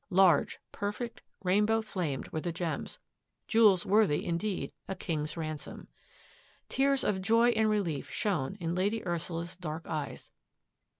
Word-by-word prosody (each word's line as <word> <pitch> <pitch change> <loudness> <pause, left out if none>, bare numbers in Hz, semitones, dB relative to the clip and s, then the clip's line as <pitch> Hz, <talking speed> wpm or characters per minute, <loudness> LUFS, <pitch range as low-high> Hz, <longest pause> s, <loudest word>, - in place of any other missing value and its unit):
Large, 180 -5 +4
perfect, 210 +4 -4 0.2
rainbow 210 +4 +3
flamed 175 -10 -3
were 155 - -3
the 175 - -2
gems 165 -2 -3 0.3
— - - -53
jewels 210 -6 +5
worthy 205 -6 +3
indeed 180 +4 -2
a 195 - -3
king's 155 -3 -3
ransom. 155 -2 -5 0.8
Tears 275 0 +2
of 190 -2 0
joy 230 +4 +4
and 220 -2 +3
relief 170 -11 -1
shone 135 -1 -1
in 170 -1 -2
Lady 205 +5 0
Ursula's 170 0 -3
dark 160 -2 -5
eyes. 150 -3 -5
185 Hz, 135 wpm, -31 LUFS, 165-215 Hz, 0.8 s, jewels